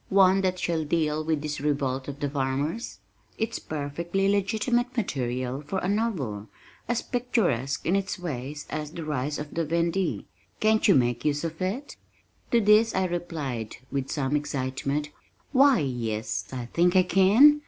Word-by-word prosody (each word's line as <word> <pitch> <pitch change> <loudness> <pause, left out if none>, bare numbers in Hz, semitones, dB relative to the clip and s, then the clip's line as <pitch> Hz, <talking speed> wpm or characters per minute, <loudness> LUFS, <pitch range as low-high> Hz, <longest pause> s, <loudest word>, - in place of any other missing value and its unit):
One 195 0 +5
that 185 -1 0
shall 170 -3 0
deal 155 0 0
with 155 -2 -1
this 150 -2 -3
revolt 135 -3 -1
of 140 0 -6
the 145 - 0
farmers? 140 - -2 0.4
It's 225 +1 -2
perfectly 170 +6 -2
legitimate 225 +5 +1
material 130 - -2
for 150 +6 -4
a 180 - -1
novel, 170 - -1 0.4
as 240 -1 0
picturesque 190 - 0
in 175 - +2
its 195 0 -1
way 145 -5 -4 0.2
as 150 -1 -3
The 165 0 -7
Rise 145 -1 -2
of 150 0 -6
the 165 - 0
Vendée 170 +3 0 0.3
Can't 220 0 +3
you 195 - +6
make 120 -2 +2
use 150 0 0
of 165 0 -4
it?" 215 +10 -3 0.5
To 235 - +4
this 215 +1 +5
I 190 0 +2
replied, 155 -10 -3 0.2
with 135 -1 -2
some 140 -1 0
excitement 140 +1 -2 0.4
"Why 275 0 +6
yes, 120 - -2
I 125 -2 -4
think 175 +8 +2
I 185 - +7
can. 210 +12 +6
160 Hz, 160 wpm, -27 LUFS, 140-195 Hz, 0.5 s, I